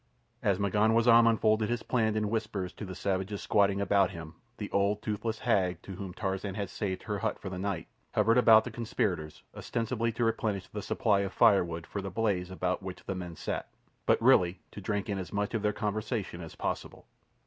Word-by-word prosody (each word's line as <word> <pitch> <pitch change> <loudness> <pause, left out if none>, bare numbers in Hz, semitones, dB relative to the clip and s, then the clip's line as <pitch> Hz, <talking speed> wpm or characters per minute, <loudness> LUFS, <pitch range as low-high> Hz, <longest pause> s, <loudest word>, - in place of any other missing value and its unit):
As 100 -2 +2
M'ganwazam 115 +4 +5
unfolded 110 -1 +2
his 120 -1 -1
plan 110 -3 +1
in 105 -1 0
whispers 105 -5 -2
to 105 - -7
the 95 -1 -7
savages 95 +2 -2
squatting 100 -1 +3
about 100 -2 +3
him 80 -1 -8 0.2
the 105 - -6
old, 100 +1 +1
toothless 110 +1 -2
hag, 95 -7 +1
to - - -9
whom 95 0 -6
Tarzan 95 +1 -3
had 100 -2 -3
saved 95 -3 -3
her 105 -2 -3
hut - - -1
for 95 - -7
the 90 -1 -5
night, 95 -4 -3 0.3
hovered 115 +3 +4
about 110 -2 +7
the 125 - -6
conspirators 95 -9 -2
ostensibly 115 0 -1
to 120 - -1
replenish 110 -4 0
the 105 - -6
supply 105 0 +1
of 100 -1 -2
firewood 85 -4 +3
for 100 - -5
the 95 - -4
blaze 95 -3 0
about 90 0 -2
which 95 -1 -7
the 95 - -2
men 90 -2 -6
sat, - - -4 0.4
but - - +4
really 90 0 +4
to 105 - -8
drink 100 0 -2
in 100 -2 -2
as 90 - -6
much 105 +1 -1
of 115 - 0
their 105 0 +2
conversation 105 -3 -3
as 80 -2 -9
possible. - - -4
100 Hz, 200 wpm, -30 LUFS, 95-110 Hz, 0.4 s, about